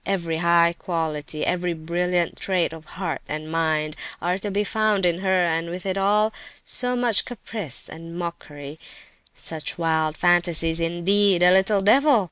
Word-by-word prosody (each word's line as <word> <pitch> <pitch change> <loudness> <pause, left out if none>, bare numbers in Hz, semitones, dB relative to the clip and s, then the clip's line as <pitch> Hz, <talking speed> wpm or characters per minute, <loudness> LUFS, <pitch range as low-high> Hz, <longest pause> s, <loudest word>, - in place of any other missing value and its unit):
Every 170 -4 -2
high 170 0 +4
quality, 155 -4 -3
every 180 -1 -1
brilliant 175 +2 -1
trait 180 -4 -1
of 160 -1 -11
heart 175 -4 -3
and 155 +1 -5
mind, 155 -2 0 0.2
are 180 +3 -1
to 205 - -4
be 200 +1 0
found 210 -2 +1
in 175 0 +2
her, 190 -2 +2
and, 165 0 -1
with 180 +2 -6
it 190 -1 -1
all, 210 +3 +2 0.3
so 250 0 0
much 240 -4 +3
caprice 215 - -3
and 165 +1 -9
mockery, 150 -4 -7 0.6
such 160 -2 -5
wild 160 -2 0
fancies—indeed, 175 +2 +2
a 180 - +7
little 195 +1 +3
devil! 270 +5 +5
175 Hz, 150 wpm, -23 LUFS, 165-195 Hz, 0.6 s, a